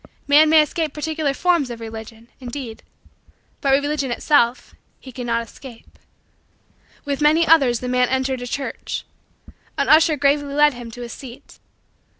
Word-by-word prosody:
Man 300 Hz, +2 st, +6 dB
may 315 Hz, -1 st, +6 dB
escape 315 Hz, -1 st, -3 dB
particular 310 Hz, -1 st, -2 dB
forms 340 Hz, -6 st, +1 dB
of 235 Hz, -1 st, -7 dB
Religion, 225 Hz, 0 st, -9 dB
indeed, 245 Hz, -2 st, -7 dB, 0.8 s
but 275 Hz, -, 0 dB
Religion 285 Hz, 0 st, 0 dB
itself 245 Hz, -1 st, +1 dB, 0.3 s
he 260 Hz, -, -12 dB
cannot 235 Hz, -2 st, -2 dB
escape. 245 Hz, -3 st, -14 dB, 1.1 s
With 280 Hz, 0 st, -3 dB
many 310 Hz, +3 st, +4 dB
others 270 Hz, -8 st, +4 dB
the 250 Hz, -, -4 dB
man 250 Hz, 0 st, +1 dB
entered 265 Hz, -1 st, -1 dB
a 245 Hz, -, -5 dB
church. 275 Hz, +3 st, -5 dB, 0.7 s
An -, -, 0 dB
usher 315 Hz, 0 st, +5 dB
gravely 285 Hz, 0 st, +1 dB
led 295 Hz, 0 st, +4 dB
him 240 Hz, -1 st, -9 dB
to 245 Hz, +2 st, -9 dB
a -, -, -6 dB
seat. 245 Hz, +1 st, -12 dB
275 Hz, 150 wpm, -21 LUFS, 245-300 Hz, 1.1 s, Man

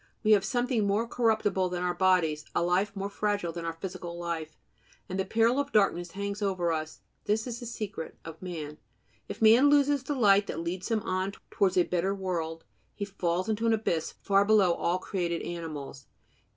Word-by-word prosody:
We 215 Hz, -, +3 dB
have 205 Hz, -2 st, +6 dB
something 240 Hz, 0 st, 0 dB
more 210 Hz, +4 st, +1 dB
corruptible 220 Hz, -6 st, +1 dB
than 180 Hz, 0 st, -3 dB
our 180 Hz, 0 st, 0 dB
bodies, 175 Hz, -5 st, +2 dB
a -, -, +2 dB
life 190 Hz, +4 st, +1 dB
more 195 Hz, 0 st, -3 dB
fragile 205 Hz, -3 st, -1 dB
than 170 Hz, 0 st, -5 dB
our 165 Hz, -, -2 dB
physical 170 Hz, 0 st, -6 dB
life; 165 Hz, -2 st, -4 dB, 0.5 s
and 190 Hz, +1 st, -4 dB
the 190 Hz, -, 0 dB
peril 230 Hz, +6 st, +2 dB
of 285 Hz, 0 st, -2 dB
darkness 175 Hz, -6 st, +2 dB
hangs 200 Hz, +1 st, -4 dB
over 185 Hz, -4 st, 0 dB
us. 155 Hz, -1 st, -4 dB, 0.2 s
This 215 Hz, +2 st, +1 dB
is 240 Hz, -2 st, -5 dB
the 240 Hz, -, -7 dB
secret 205 Hz, -7 st, -6 dB
of 165 Hz, -1 st, -9 dB
man. 155 Hz, -5 st, -6 dB, 0.5 s
If -, -, -4 dB
man 235 Hz, +6 st, +7 dB
loses 285 Hz, -1 st, +4 dB
the 285 Hz, +2 st, -3 dB
light 205 Hz, -5 st, +4 dB
that -, -, -4 dB
leads 180 Hz, +4 st, -4 dB
him 220 Hz, -2 st, 0 dB
on 185 Hz, +1 st, -1 dB, 0.2 s
towards 190 Hz, -2 st, +2 dB
a 180 Hz, -, +6 dB
better 180 Hz, +3 st, 0 dB
world, 165 Hz, -4 st, -3 dB, 0.3 s
he 200 Hz, -, -3 dB
falls 185 Hz, -2 st, -1 dB
into 220 Hz, +1 st, 0 dB
an 225 Hz, -, +4 dB
abyss 175 Hz, -7 st, -1 dB
far 200 Hz, 0 st, +4 dB
below 200 Hz, -4 st, +4 dB
all 175 Hz, +1 st, 0 dB
created 175 Hz, -3 st, -2 dB
animals. 155 Hz, -5 st, -6 dB
190 Hz, 190 wpm, -29 LUFS, 170-215 Hz, 0.5 s, man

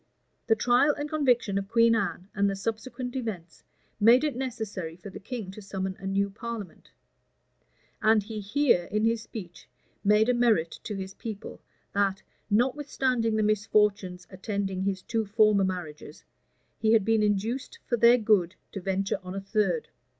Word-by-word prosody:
The 225 Hz, -, +4 dB
trial 245 Hz, +6 st, +3 dB
and 290 Hz, 0 st, -3 dB
conviction 245 Hz, -9 st, +1 dB
of 195 Hz, -, -6 dB
Queen 230 Hz, +1 st, +4 dB
Anne, 200 Hz, -4 st, -1 dB
and 200 Hz, 0 st, +2 dB
the 195 Hz, -, -2 dB
subsequent 235 Hz, +5 st, -4 dB
events, 205 Hz, -10 st, -5 dB, 0.4 s
made 235 Hz, +5 st, +6 dB
it 295 Hz, -5 st, 0 dB
necessary 220 Hz, -10 st, -4 dB
for 185 Hz, +3 st, -10 dB
the -, -, -9 dB
king 215 Hz, -3 st, -6 dB
to 215 Hz, -, -10 dB
summon 190 Hz, -1 st, -4 dB
a 195 Hz, -, -6 dB
new 200 Hz, +1 st, 0 dB
parliament; 220 Hz, -1 st, -7 dB, 1.1 s
and 220 Hz, -1 st, +4 dB
he 215 Hz, +1 st, -6 dB
here, 210 Hz, -3 st, +2 dB
in 215 Hz, +3 st, 0 dB
his 230 Hz, 0 st, +1 dB
speech, 185 Hz, -6 st, -10 dB, 0.3 s
made 210 Hz, +2 st, +4 dB
a 250 Hz, -, +3 dB
merit 225 Hz, -9 st, +2 dB
to 210 Hz, -, -4 dB
his 190 Hz, 0 st, -6 dB
people, 215 Hz, -1 st, -8 dB, 0.3 s
that, 200 Hz, -1 st, 0 dB, 0.3 s
notwithstanding 250 Hz, -1 st, +1 dB
the 215 Hz, -, +2 dB
misfortunes 205 Hz, -3 st, +1 dB
attending 195 Hz, -1 st, -3 dB
his 190 Hz, -1 st, -2 dB
two 225 Hz, -1 st, -1 dB
former 210 Hz, -1 st, +3 dB
marriages, 170 Hz, -5 st, -5 dB, 0.6 s
he 220 Hz, 0 st, +3 dB
had 215 Hz, -4 st, +4 dB
been 225 Hz, -1 st, +3 dB
induced 220 Hz, -, -1 dB
for 240 Hz, -, 0 dB
their 235 Hz, +1 st, +6 dB
good 205 Hz, -6 st, +2 dB, 0.2 s
to 195 Hz, -, -6 dB
venture 195 Hz, +1 st, -1 dB
on 185 Hz, 0 st, -7 dB
a -, -, -2 dB
third. 215 Hz, -, 0 dB
210 Hz, 165 wpm, -27 LUFS, 195-235 Hz, 1.1 s, made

